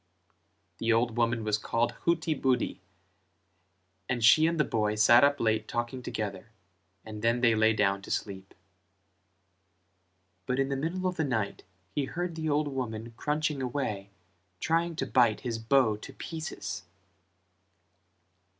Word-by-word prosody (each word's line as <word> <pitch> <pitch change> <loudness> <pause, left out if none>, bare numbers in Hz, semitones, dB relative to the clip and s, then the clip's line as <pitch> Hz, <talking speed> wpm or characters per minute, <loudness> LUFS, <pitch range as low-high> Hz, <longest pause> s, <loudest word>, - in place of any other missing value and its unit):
The 115 - +1
old 115 0 +2
woman 115 -1 +1
was 110 0 0
called 115 +2 0
Hutibudi; 155 -7 +1 1.3
and 125 -2 -1
she 155 +8 +7
and 165 -1 -1
the - - +5
boy 105 -5 0
sat 120 +3 +6
up 140 0 +4
late 110 -1 +1
talking 120 +2 -3
together 105 -4 -5 0.6
and 105 -1 -8
then 115 +2 +2
they 115 -2 +5
lay 110 0 +4
down 100 -2 +1
to - - -11
sleep; 95 -1 -4 1.9
but 125 -1 0
in 135 0 +1
the 135 - -1
middle 165 +7 -3
of 185 -1 -1
the 160 - +1
night 115 -8 -2 0.3
he 145 - 0
heard 175 +4 -4
the 160 -1 -3
old 150 +1 +1
woman 115 -4 -5
crunching 150 +2 -1
away 120 -7 -3 0.5
trying 165 +1 0
to - - -2
bite 120 -4 +3
his 115 -3 -3
bow 115 -1 +3
to - - -11
pieces. 105 - -6
120 Hz, 140 wpm, -29 LUFS, 110-145 Hz, 1.9 s, she